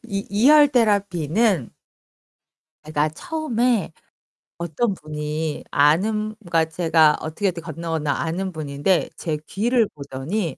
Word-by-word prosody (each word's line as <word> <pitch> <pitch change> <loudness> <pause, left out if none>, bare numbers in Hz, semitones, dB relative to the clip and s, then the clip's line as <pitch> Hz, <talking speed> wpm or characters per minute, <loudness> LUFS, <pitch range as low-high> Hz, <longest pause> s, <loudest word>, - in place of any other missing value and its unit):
이 200 -2 -4
이혈 290 +8 +6
테라피는 200 - +1 1.1
제가 155 0 0
처음에 245 - -1 0.7
어떤 170 +6 -1
분이 150 -1 -4
아는 210 +9 +2
그러니까 170 -5 +1
제가 160 -2 +3
어떻게, 160 +6 -1
어떻게 170 -2 -6
건너건너 160 -2 -3
아는 180 +5 -2
분인데 155 +2 0
제 155 -3 -2
귀를 230 +2 +1
보더니 145 +5 -4
170 Hz, 255 characters per minute, -22 LUFS, 155-215 Hz, 1.1 s, 이혈